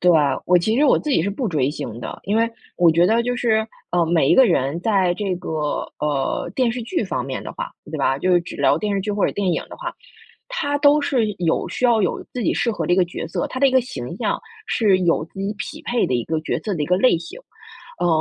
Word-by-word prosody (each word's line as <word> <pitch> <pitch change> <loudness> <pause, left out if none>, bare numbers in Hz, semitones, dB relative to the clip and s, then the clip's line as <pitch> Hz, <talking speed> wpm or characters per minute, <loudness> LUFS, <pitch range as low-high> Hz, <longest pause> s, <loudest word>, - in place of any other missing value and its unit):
对， 180 - +5 0.4
我 180 - +5
其 215 +6 0
实 295 - +4
我 - - +5
自 300 - -4
己 265 - +3
是 190 - -1
不 220 +5 -2
追 145 -8 +1
星 120 -6 -6
的。 - - -6
因 205 +3 0
为 230 0 +2 0.3
我 175 -2 +5
觉 170 +2 +4
得 225 +4 +3
就 245 +1 -1
是， 220 -3 +1 0.2
呃， 175 -1 +2
每 160 -4 +2
一 - - +6
个 265 - +7
人 140 - 0
在 190 -3 +2
这 190 0 -2
个， 175 - -7 0.5
呃， 145 +2 -1
电 250 -3 +1
视 245 - -4
剧 340 0 -1
方 185 - -2
面 135 -1 -5
的 - - -6
话， - - -5 0.2
对 - - -3
吧， 135 - +2
就 185 +6 +1
是 175 - +5
只 170 - -9
聊 - - +3
电 210 -1 -1
视 195 - 0
剧 210 +1 -2
或 205 -1 +1
者 - - -1
电 200 - -2
影 - - -1
的 - - -10
话， - - -5 0.6
他 290 -13 -1
都 290 +1 +5
是 260 -5 +1
有 170 -2 0
需 - - -3
要 235 -3 +4
有 185 - -1
自 250 - -3
己 - - +1
适 235 - 0
合 - - -3
的 175 - +3
一 - - -2
个 185 - +4
角 170 -1 -6
色， - - -2
他 255 - -5
的 275 - +6
一 - - +1
个 260 -1 +4
形 255 +2 -6
象 - - -1 0.3
是 205 -5 +3
有 170 -3 +2
自 180 - -15
己 195 +1 -2
匹 - - -6
配 240 -1 0
的 130 - -1
一 120 -1 0
个 160 -1 -1
角 155 - -2
色 210 - -3
的 155 - -2
一 - - -1
个 180 - +3
类 195 -3 +4
型。 380 - -9 0.6
呃， 175 - +2
195 Hz, 295 characters per minute, -21 LUFS, 170-240 Hz, 0.6 s, 个